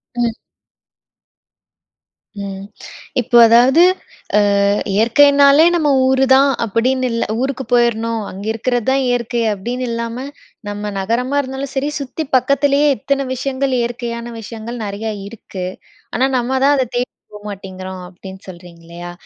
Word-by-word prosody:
ம். 240 -1 0 2.1
ம். 195 -1 -6 0.6
இப்போ 240 0 +2
அதாவது, 245 +8 +6 0.8
அ - - +3 0.3
இயற்கைனாலே 280 +7 +5
நம்ம 310 -3 +1 0.2
ஊருதான் 265 +1 +4
அப்படின்னு 255 +4 0
இல்ல. 230 - 0 0.2
ஊருக்கு 265 0 -2
போயிரணும், 230 -1 +2
அங்க 195 +2 -8
இருக்கறது 240 +1 -2
தான் 270 +1 +2
இயற்கை 240 -1 -1
அப்படின்னு 240 +6 -4
இல்லாம. 230 0 -4 0.5
நம்ம 205 0 -4
நகரமா 240 +8 -1
இருந்தாலும் 265 +1 -6
சரி, 270 +2 0
சுத்தி 280 +4 -4
பக்கத்திலயே 280 +2 +2
எத்தன 275 +5 -1
விஷயங்கள் 265 +1 -2
இயற்கையான 235 0 -4
விஷயங்கள் 225 +2 -7
நெறையா 210 +2 -4 0.2
இருக்கு. 200 -4 -8 0.5
ஆனா 260 - +2
நம்ம 255 +2 0
தான் 285 +1 +5
அத 260 - +2
தேடி 245 +1 -1 0.2
போ 210 - -9
மாட்டேங்கிறோம் 190 -2 -8
அப்படின்னு 190 +1 -11
சொல்றீங்க 175 -2 -12
இல்லையா? 175 +1 -8
240 Hz, 125 wpm, -17 LUFS, 210-265 Hz, 2.1 s, அதாவது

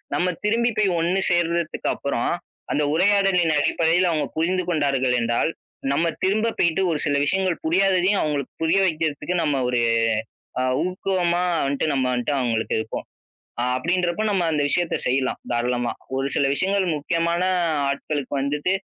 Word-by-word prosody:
நம்ம 180 - +1 0.2
திரும்பி 230 +3 +2
போய் 210 -2 +3
ஒண்ணு 175 +3 +1
சேர்றதுக்கப்புறம், 170 -6 0 0.4
அந்த 150 - +1
உரையாடலின் 190 -2 +3
அடிப்படையில 165 +4 +2
அவுங்க 155 -2 0
புரிந்து 180 +3 0
கொண்டார்கள் 135 -6 +1
என்றால், 120 +7 +1 0.4
நம்ம 165 +4 +1 0.2
திரும்ப 215 +4 +2
போய்ட்டு 170 +2 +2
ஒரு 155 - -1
சில 145 - +1
விஷயங்கள் 185 +2 0
புரியாததையும் 190 +3 +3
அவுங்களுக்கு 145 -3 -2
புரிய 165 +4 +3
வைக்குறதுக்கு 160 +1 -2
நம்ம 150 -2 +1
ஒரு 125 -1 +1 0.8
அ - - +1 0.2
ஊக்குவமா 180 -1 0 0.2
வன்ட்டு 140 0 -1
நம்ம 135 -2 +1
வன்ட்டு 125 +3 -1
அவுங்களுக்கு 115 -3 -1
இருப்போ. 110 0 -4 0.6
அ - - +1
அப்டின்றப்போ 175 +6 0
நம்ம 195 -3 +1
அந்த 150 -1 +1
விஷயத்த 175 +3 0
செய்யலாம், 130 +1 0
தாராளமா. 120 0 0 0.2
ஒரு 135 +1 0
சில - - +2
விஷயங்கள் 195 +4 0
முக்கியமான 170 +3 0 0.5
ஆட்களுக்கு 140 0 -3
வந்துட்டு, 145 +6 0
165 Hz, 140 wpm, -23 LUFS, 140-185 Hz, 0.8 s, போய்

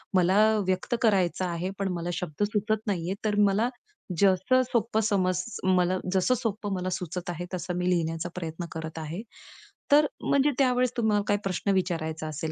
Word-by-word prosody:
मला 185 +1 +4 0.3
व्यक्त 185 +5 0
करायचं 190 -5 +2
आहे, 175 +1 -2
पण 195 -1 0
मला 170 0 -3
शब्द 175 +1 -3
सुचत 215 +1 -1
नाहीये, 180 -2 -1
तर 210 -1 +1
मला 215 +5 +1 0.5
जसं 195 +6 +4
सोपं 230 -2 +1
समज 185 -4 +1 0.2
मला 185 0 +3 0.2
जसं 190 +7 +3
सोपं 210 -3 -3
मला 185 -1 -2
सुचत 180 0 -4
आहे 175 0 -4
तसं 180 0 -3
मी 180 0 0
लिहिण्याचा 165 -1 0
प्रयत्न 170 -1 -5
करत 160 0 -6
आहे. 160 +5 -5 0.7
तर 295 +1 +7 0.2
म्हणजे 280 +1 +3
त्यावेळेस 250 -2 +3
तुम्हाला 215 -3 +2
काही 205 0 +2
प्रश्न 195 +1 -1
विचारायचा 165 -4 -1
असेल, 155 +1 -4
185 Hz, 165 wpm, -27 LUFS, 175-210 Hz, 0.7 s, तर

